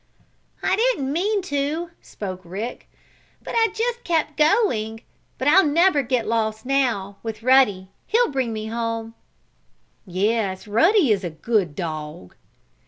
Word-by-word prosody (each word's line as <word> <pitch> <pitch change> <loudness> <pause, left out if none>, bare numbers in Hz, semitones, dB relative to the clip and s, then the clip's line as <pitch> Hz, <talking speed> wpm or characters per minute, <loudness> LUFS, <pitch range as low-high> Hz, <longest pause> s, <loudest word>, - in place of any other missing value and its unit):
"I 375 - +2
didn't 430 - +1
mean 400 +4 0
to," 310 +1 -2
spoke 185 -3 -7
Rick. 200 +8 -6 0.5
"But - - -7
I 455 -1 +4
just 475 +2 -2
kept 315 -3 0
going. 280 - +1 0.4
But 260 - -2
I'll 375 +6 +7
never 315 +1 +3
get 250 -3 -1
lost, 220 0 -1
now, 240 -8 0
with 225 -1 -6
Ruddy. 230 -8 +4 0.2
He'll 475 -2 +2
bring 260 -4 -1
me 215 -1 -4
home." 230 0 -3 0.9
"Yes, 195 +1 -1
Ruddy 320 - +4
is 200 -2 +1
a 175 - -2
good 175 0 -1
dog." 150 - -6
235 Hz, 135 wpm, -22 LUFS, 210-320 Hz, 0.9 s, I'll